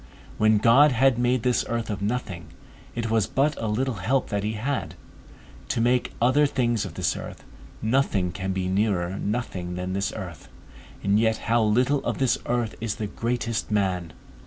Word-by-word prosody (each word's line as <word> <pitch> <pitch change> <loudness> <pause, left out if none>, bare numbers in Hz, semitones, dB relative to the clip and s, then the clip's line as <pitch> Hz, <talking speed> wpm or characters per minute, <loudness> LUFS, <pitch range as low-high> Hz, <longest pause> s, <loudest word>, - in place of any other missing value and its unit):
When 110 0 +5
God 130 +7 +6
had 125 0 +3
made 125 -1 +1
this 125 -1 +2
earth 115 -1 -2
of 100 - -4
nothing, 100 -5 -3 0.5
it 115 -1 -2
was 110 -3 +2
but 145 +2 +1
a 115 - -1
little 120 +2 -1
help 130 +5 +1
that 100 -1 -1
he 105 +1 -1
had, 110 - -3 0.7
to - - -1
make 120 +2 +1
other 130 +5 +4
things 120 -6 0
of 90 - -8
this 85 -5 0
earth: - - -8 0.4
nothing 110 -6 +1
can 95 +2 -3
be 95 -1 -2
nearer 95 -2 0
nothing 100 -5 -3
than 90 +1 -3
this 100 +1 -1
earth; - - -8 0.5
and 100 +1 +3
yet 110 0 +2
how 115 +1 +3
little 125 +6 +2
of - - -2
this 130 -3 +1
earth 120 -2 0
is 115 -2 -2
the 110 - -3
greatest 115 +1 -2
man! 95 -5 0
110 Hz, 180 wpm, -25 LUFS, 100-125 Hz, 0.7 s, God